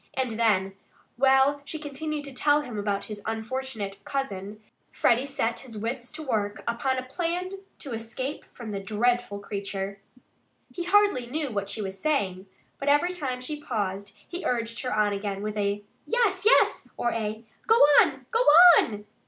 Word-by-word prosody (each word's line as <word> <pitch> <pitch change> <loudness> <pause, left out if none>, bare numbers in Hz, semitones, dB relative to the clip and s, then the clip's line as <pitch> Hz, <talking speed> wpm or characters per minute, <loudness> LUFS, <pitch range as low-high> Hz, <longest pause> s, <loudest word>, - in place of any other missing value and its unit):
And 260 -2 -1
then, 210 -4 +1 0.4
while 270 +2 +4
she 285 +3 -5
continued 300 0 -4
to 280 - -7
tell 290 +3 +3
him 245 -6 -7
about 200 -1 -1
his 210 -1 -7
unfortunate 220 -3 -4
cousin, 210 -7 -4 0.3
Freddie 250 +3 +2
set 270 -5 -1
his 235 -5 -8
wits 235 +3 -4
to 315 0 -5
work 210 -6 -2
upon 240 +3 0
a 255 - -2
plan 350 +6 -2 0.3
to 275 - -8
escape 235 +5 -5
from 230 -3 -8
the 200 - -3
dreadful 225 +2 0
creature. 200 -1 -5 0.7
He 350 - -4
hardly 405 -9 +3
knew 290 +1 -3
what 200 -2 -3
she 215 +1 -3
was 195 0 -6
saying. 200 -11 -1 0.3
But 280 - 0
every 295 +5 +3
time 260 -8 -3
she 295 +4 -5
paused 200 -6 -3
he 350 +1 -6
urged 230 -4 -1
her 255 - -3
on 210 -1 +2
again 200 0 -3
with 215 0 -3
a 205 0 -1 0.2
"Yes, 420 -5 +1
yes!" - - +4
or 240 - 0
a 220 0 -3 0.2
"Go 450 - +6 0.3
on! - - -1
Go 455 - +2 0.4
on!" 210 -2 -2
240 Hz, 170 wpm, -27 LUFS, 205-285 Hz, 0.7 s, Go